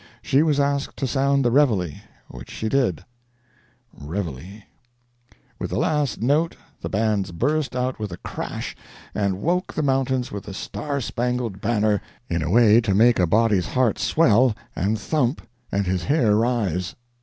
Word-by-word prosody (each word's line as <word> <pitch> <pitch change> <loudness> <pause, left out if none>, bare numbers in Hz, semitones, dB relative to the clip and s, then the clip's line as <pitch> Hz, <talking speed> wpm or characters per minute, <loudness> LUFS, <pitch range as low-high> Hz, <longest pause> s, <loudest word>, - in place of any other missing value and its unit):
She 135 - +3
was 155 -3 +2
asked 140 0 0
to 135 - -1
sound 140 +1 +1
the 120 - +3
"reveille," 110 - +2 0.3
which 65 0 -11
she 110 - -4
did. 115 - 0 0.9
[Picture: 70 - -11
Reveille 85 -2 -3
[music 85 +10 -11 0.8
score]] - - -27 0.2
With - - -3
the - - -2
last 150 -6 0
note 150 +6 +2 0.3
the - - -4
bands 105 -3 0
burst 140 - -1
out 125 -1 -1
with 105 -3 -4
a 90 - -6
crash: - - -6 0.4
and 100 -2 -1
woke 180 +3 0
the 155 - 0
mountains 130 -2 0
with 100 -1 -6
the 95 - -7
"Star 145 +5 -4
Spangled 120 -4 -2
Banner" 105 -2 +1 0.3
in 85 -1 0
a 80 - -2
way 115 +2 +6
to 100 -4 0
make 115 +2 +5
a 90 - +3
body's 105 -1 +2
heart 125 -5 +1
swell 125 -6 +3 0.2
and 105 +4 0
thump 135 -1 -1 0.2
and 100 0 0
his 90 -1 -1
hair 125 -8 +3
rise! 105 -7 0
115 Hz, 170 wpm, -23 LUFS, 100-135 Hz, 0.9 s, way